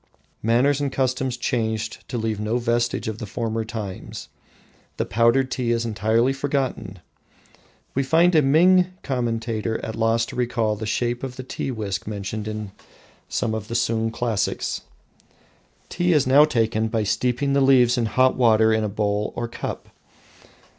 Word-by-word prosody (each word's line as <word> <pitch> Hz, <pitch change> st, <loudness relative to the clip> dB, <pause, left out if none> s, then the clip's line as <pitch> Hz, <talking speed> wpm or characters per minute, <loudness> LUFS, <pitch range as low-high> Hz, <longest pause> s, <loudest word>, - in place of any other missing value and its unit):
Manners 130 Hz, +6 st, +2 dB
and 140 Hz, -2 st, -1 dB
customs 130 Hz, -1 st, -1 dB
changed 110 Hz, -3 st, -2 dB
to 125 Hz, -, -3 dB
leave 110 Hz, -2 st, -2 dB
no 110 Hz, +3 st, 0 dB
vestige 120 Hz, -1 st, 0 dB
of 110 Hz, 0 st, -4 dB
the 110 Hz, -, -6 dB
former 115 Hz, +1 st, -2 dB
times. 110 Hz, -4 st, -7 dB, 0.7 s
The -, -, -1 dB
powdered 115 Hz, +4 st, +2 dB
tea 125 Hz, -2 st, -1 dB
is 115 Hz, 0 st, +1 dB
entirely 115 Hz, +4 st, +1 dB
forgotten. 130 Hz, -8 st, -2 dB, 1.0 s
We 135 Hz, -, +1 dB
find 165 Hz, +6 st, +3 dB
a 155 Hz, -, +6 dB
Ming 175 Hz, +6 st, +5 dB, 0.2 s
commentator 115 Hz, -3 st, -2 dB
at 110 Hz, -, -5 dB
loss 115 Hz, +1 st, +1 dB
to -, -, -9 dB
recall 115 Hz, -3 st, 0 dB
the 110 Hz, +1 st, -5 dB
shape 120 Hz, +2 st, -1 dB
of 130 Hz, -2 st, -5 dB
the 130 Hz, -, -7 dB
tea 130 Hz, -, -4 dB
whisk 105 Hz, -7 st, -4 dB
mentioned 105 Hz, +1 st, -4 dB
in 110 Hz, -2 st, -5 dB, 0.7 s
one 115 Hz, -2 st, 0 dB
of 110 Hz, -1 st, -4 dB
the 115 Hz, -, -5 dB
Sung 115 Hz, -1 st, +1 dB
classics. 115 Hz, -3 st, -2 dB, 1.1 s
Tea 175 Hz, 0 st, +1 dB
is 150 Hz, -4 st, +3 dB
now 140 Hz, +4 st, +6 dB
taken 115 Hz, -5 st, 0 dB
by 110 Hz, -1 st, -1 dB
steeping 125 Hz, +6 st, 0 dB
the 140 Hz, -, +3 dB
leaves 125 Hz, -3 st, +5 dB
in 120 Hz, -3 st, 0 dB
hot 130 Hz, +3 st, +3 dB
water 110 Hz, -2 st, +4 dB
in 110 Hz, 0 st, +1 dB
a 105 Hz, -, -1 dB
bowl 105 Hz, 0 st, -1 dB
or 120 Hz, -, -3 dB
cup. 115 Hz, -, -6 dB
115 Hz, 160 wpm, -23 LUFS, 110-130 Hz, 1.1 s, a